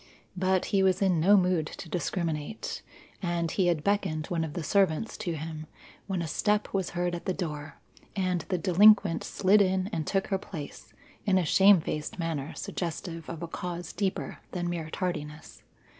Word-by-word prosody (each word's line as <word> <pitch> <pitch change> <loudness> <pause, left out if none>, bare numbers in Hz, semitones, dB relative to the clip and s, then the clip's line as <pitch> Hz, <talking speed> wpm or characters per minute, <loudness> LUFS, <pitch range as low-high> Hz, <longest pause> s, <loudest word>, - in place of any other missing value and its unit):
But 185 0 +1
he 195 - +4
was 190 -1 +3
in 185 -4 +2
no 200 +6 +6
mood 180 -4 +2
to - - -8
discriminate, 165 +1 -3 0.4
and 170 -3 -1
he 185 -3 +2
had 165 -4 +1
beckoned 185 -6 0
one 170 -2 0
of 155 -2 -4
the 175 - -4
servants 195 +4 +1
to 170 - -3
him, 155 0 -6 0.4
when 190 -3 -1
a - - -3
step 210 +6 0
was 190 -2 0
heard 175 0 0
at 175 - -5
the 185 - -1
door 150 -5 -5 0.4
and 185 -3 0
the 185 - +1
delinquent 195 +1 +5
slid 200 +2 +3
in 190 +1 +1
and 160 -2 -2
took 195 -1 +1
her 195 -2 +1
place, 160 -7 -8 0.4
in 190 -2 +4
a 180 - +2
shamefaced 175 -4 +4
manner 160 -4 -3
suggestive 165 -1 -5
of 170 0 -6
a - - -3
cause 175 +1 -5
deeper 195 -2 -2
than 175 -2 -2
mere 165 -2 -4
tardiness. 155 -4 -5
175 Hz, 175 wpm, -28 LUFS, 160-190 Hz, 0.4 s, no